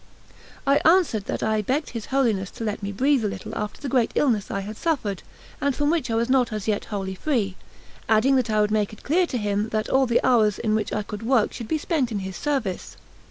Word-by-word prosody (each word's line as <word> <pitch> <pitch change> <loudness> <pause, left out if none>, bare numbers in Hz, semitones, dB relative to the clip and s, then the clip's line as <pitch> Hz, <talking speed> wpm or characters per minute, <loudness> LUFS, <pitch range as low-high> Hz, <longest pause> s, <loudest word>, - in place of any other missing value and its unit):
I 275 +1 +4
answered 320 - +3
that - - -3
I 220 -1 +1
begged 270 +8 -1
his 230 -3 -6
Holiness 225 -8 +1
to - - -5
let 210 -1 -3
me 200 0 -3
breathe 265 +4 +2
a - - +1
little 190 -2 -6
after 210 0 -4
the 285 - -5
great 250 -3 +2
illness 230 -8 +1
I 195 - -2
had 210 +2 -7
suffered, 220 - -1 0.4
and 280 -1 +1
from 290 +1 +1
which 325 -7 0
I 225 - 0
was 230 +1 +1
not 255 -2 +2
as 215 -1 -4
yet 210 -2 0
wholly 195 -3 -4
free, 200 -3 -1 0.5
adding 225 +5 +4
that 250 -3 0
I 215 -1 +2
would 210 0 +1
make 215 -1 0
it 215 - -13
clear 350 +5 +2
to 255 - -2
him 210 0 -1
that 215 -1 -2
all 265 0 +3
the 235 - +2
hours 220 -5 +4
in 215 - 0
which 215 -1 0
I 210 - -1
could 210 0 -7
work 230 -2 +2
should 230 - -6
be 315 - 0
spent 295 -6 -1
in 215 - -1
his 190 0 -6
service. 270 -11 -3
225 Hz, 245 wpm, -24 LUFS, 210-270 Hz, 0.5 s, I